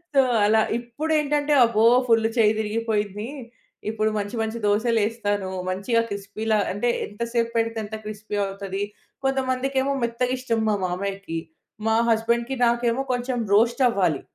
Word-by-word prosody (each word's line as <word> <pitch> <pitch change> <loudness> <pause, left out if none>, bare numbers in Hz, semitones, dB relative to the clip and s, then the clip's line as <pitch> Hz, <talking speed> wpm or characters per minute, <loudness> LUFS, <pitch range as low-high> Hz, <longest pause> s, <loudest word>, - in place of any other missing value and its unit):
So, 275 - +7 0.2
అలా. 220 +1 +4 0.2
ఇప్పుడేంటంటే 295 +4 0
అబ్బో! 225 -1 +2 0.2
ఫుల్ 225 -1 +4
చెయ్యి 215 -2 +5
తిరిగిపోయింది. 210 -1 -2 0.6
ఇప్పుడు 215 0 0
మంచి 205 +3 -4
మంచి 220 +1 -2
దోసలు 225 +3 +2
యేస్తాను. 205 -3 -2 0.2
మంచిగా 200 +5 +1
క్రిస్పీలా 205 +2 -1 0.2
అంటే, 205 +5 0 0.2
ఎంతసేపు 230 +2 -2
పెడితే 230 0 0
ఎంత 210 +1 -6
క్రిస్పీ 210 0 -5
అవుతది. 195 0 -4 0.4
కొంతమందికేమో 265 +1 0
మెత్తగిష్టం 245 0 -1
మా 210 - +2
మామయ్యకి. 195 -1 -3 0.5
మా 220 - +3 0.2
హస్బెండ్‍కి 235 +3 0
నాకేమో 235 +2 +1
కొంచెం 245 +1 -2 0.2
రోస్ట్ 235 +4 +3
అవ్వాలి. 180 - +1
225 Hz, 125 wpm, -24 LUFS, 205-240 Hz, 0.6 s, So